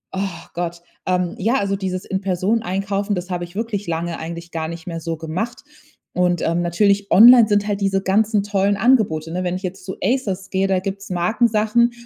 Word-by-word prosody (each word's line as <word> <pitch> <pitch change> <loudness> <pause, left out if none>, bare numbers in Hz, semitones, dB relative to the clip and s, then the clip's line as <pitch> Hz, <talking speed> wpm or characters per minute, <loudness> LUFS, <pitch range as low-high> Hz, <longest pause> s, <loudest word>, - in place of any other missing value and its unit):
Oh 190 -4 -4
Gott. 170 0 -4 0.3
Ähm. 180 -1 0
ja, 230 +7 +1
also 200 -5 0
dieses 185 -1 -3
in 190 -1 -2
Person 195 +4 0
Einkaufen, 200 +1 -1
das 180 +1 -5
habe 175 -1 -2
ich 175 +2 -17
wirklich 210 -3 -3
lange 165 0 -3
eigentlich 170 +1 -7
gar 160 -1 -3
nicht 170 +1 -8
mehr 165 -1 -4
so 165 0 -3
gemacht. 180 +10 -4 0.5
Und 180 -1 +1
ähm, 170 +1 0
natürlich 200 +3 +1
online 235 +1 +9
sind 205 -1 +2
halt 205 -1 -1
diese 195 -1 +1
ganzen 205 +1 +2
tollen 200 0 +1
Angebote, 195 -10 +2
ne? 180 +1 -2
Wenn 180 0 -1
ich 185 -1 -4
zu 190 -1 -8
Asos 200 -5 -1
gehe, 190 0 +1
da 190 -1 +1
gibt's 195 +1 -6
Markensachen, 220 +5 +2
190 Hz, 195 wpm, -20 LUFS, 175-205 Hz, 0.5 s, online